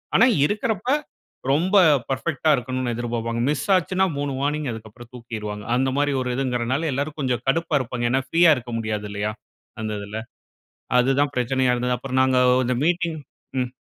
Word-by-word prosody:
ஆனா, 225 Hz, -, +7 dB, 0.2 s
இருக்கிறப்ப 215 Hz, -, -2 dB, 0.6 s
ரொம்ப 180 Hz, +8 st, +3 dB, 0.3 s
பெர்ஃபெக்டா 140 Hz, +3 st, -1 dB
இருக்கணும்னு 130 Hz, -1 st, -2 dB
எதிர்ப்பாப்பாங்க. 115 Hz, -1 st, -3 dB
மிஸ் 150 Hz, -, -1 dB
ஆச்சுன்னா 185 Hz, +1 st, +1 dB
3 145 Hz, -1 st, -2 dB
வார்னிங், 150 Hz, +1 st, -1 dB
அதுக்கப்பறம் 115 Hz, +1 st, -10 dB
தூக்கிருவாங்க. 110 Hz, -4 st, -6 dB
அந்த 130 Hz, +1 st, +2 dB
மாரி 145 Hz, 0 st, +2 dB
ஒரு 125 Hz, -, -2 dB
இதுங்குறனால 130 Hz, +3 st, -1 dB
எல்லாரும் 145 Hz, +3 st, -3 dB
கொஞ்சம் 125 Hz, -3 st, -1 dB
கடுப்பா 165 Hz, +3 st, 0 dB
இருப்பாங்க. 125 Hz, -1 st, -3 dB
ஏன்னா, 130 Hz, +1 st, +2 dB
ஃப்ரீயா 170 Hz, 0 st, +5 dB
இருக்க 120 Hz, -1 st, -7 dB
முடியாது 105 Hz, -2 st, -3 dB
இல்லயா, 105 Hz, +1 st, -2 dB, 0.5 s
அந்ததுல? 105 Hz, -1 st, -4 dB, 0.8 s
அதுதான் 135 Hz, +3 st, +2 dB
பிரச்சனையா 125 Hz, +1 st, +1 dB
இருந்துச்சு. 125 Hz, 0 st, 0 dB
அப்பறம் 130 Hz, +1 st, -1 dB
நாங்க 130 Hz, 0 st, +2 dB, 0.3 s
இந்த 125 Hz, -, +1 dB
மீட்டிங். 170 Hz, -1 st, 0 dB, 0.4 s
ம். 125 Hz, -, -1 dB
130 Hz, 150 wpm, -23 LUFS, 120-145 Hz, 0.8 s, ஆனா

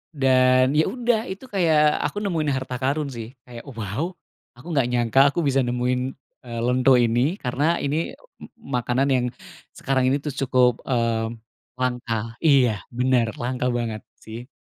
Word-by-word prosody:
dan 130 Hz, -1 st, +4 dB
ya 155 Hz, +2 st, +3 dB
udah, 240 Hz, +1 st, 0 dB
itu 190 Hz, +6 st, -8 dB
kayak 155 Hz, -5 st, +3 dB
aku -, -, -9 dB
nemuin 160 Hz, -6 st, -1 dB
harta 130 Hz, -1 st, -4 dB
karun 145 Hz, +3 st, 0 dB
sih. 115 Hz, -2 st, -7 dB, 0.2 s
Kayak, 120 Hz, -2 st, -10 dB
waw, 115 Hz, -, -3 dB, 0.5 s
aku 125 Hz, +7 st, -15 dB
nggak 135 Hz, -6 st, +2 dB
nyangka 120 Hz, +1 st, +2 dB
aku 140 Hz, -, -3 dB
bisa 135 Hz, 0 st, +2 dB
nemuin, 125 Hz, +1 st, 0 dB, 0.5 s
eee, 115 Hz, -1 st, -5 dB
lento 125 Hz, +2 st, +3 dB
ini, 120 Hz, +7 st, +2 dB
karena 130 Hz, +2 st, -1 dB, 0.2 s
ini 140 Hz, +1 st, -1 dB, 0.4 s
m -, -, -10 dB, 0.3 s
makanan 125 Hz, +3 st, 0 dB, 0.7 s
sekarang 135 Hz, -1 st, 0 dB
ini 135 Hz, +2 st, +2 dB
tuh 150 Hz, -, -3 dB
cukup, 125 Hz, -2 st, +3 dB, 0.2 s
eee, 115 Hz, -3 st, 0 dB, 0.5 s
langka 125 Hz, -2 st, -1 dB, 0.3 s
iya, 135 Hz, -4 st, +5 dB, 0.3 s
benar, 125 Hz, -1 st, +2 dB
langka 125 Hz, +1 st, -1 dB
banget 115 Hz, -3 st, -3 dB, 0.2 s
sih. 115 Hz, +3 st, -9 dB
130 Hz, 150 wpm, -23 LUFS, 120-140 Hz, 0.7 s, iya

